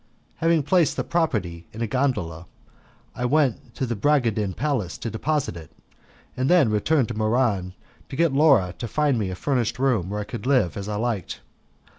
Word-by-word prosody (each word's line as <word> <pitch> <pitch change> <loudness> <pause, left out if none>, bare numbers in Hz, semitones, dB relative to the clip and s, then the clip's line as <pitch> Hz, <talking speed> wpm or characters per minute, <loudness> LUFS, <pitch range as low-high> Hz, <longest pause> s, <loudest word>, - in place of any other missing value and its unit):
Having 165 -2 +2
placed 165 0 +2
the - - 0
property 100 - -1
in 115 +2 -5
a - - +1
gondola, 105 - -1 0.7
I 125 - -3
went 140 -2 +1
to 130 - -1
the 120 -1 -2
Bragadin 110 -6 +1
Palace 135 - -2
to 115 - -5
deposit 145 - -1
it, 80 -3 -10 0.7
and 130 +1 0
then 165 -11 +5
returned 125 +5 +2
to - - -3
Muran 110 -4 0 0.4
to - - -6
get 165 -1 +2
Laura 135 - +4
to 120 - -3
find 145 0 +1
me 100 -3 -1
a 95 - -4
furnished 125 +1 -1
room 125 -9 +1
where 105 +1 -3
I - - -2
could 120 +4 -7
live 125 - +2
as 100 0 -5
I 105 - -2
liked. 110 -4 -3
120 Hz, 185 wpm, -24 LUFS, 105-140 Hz, 0.7 s, then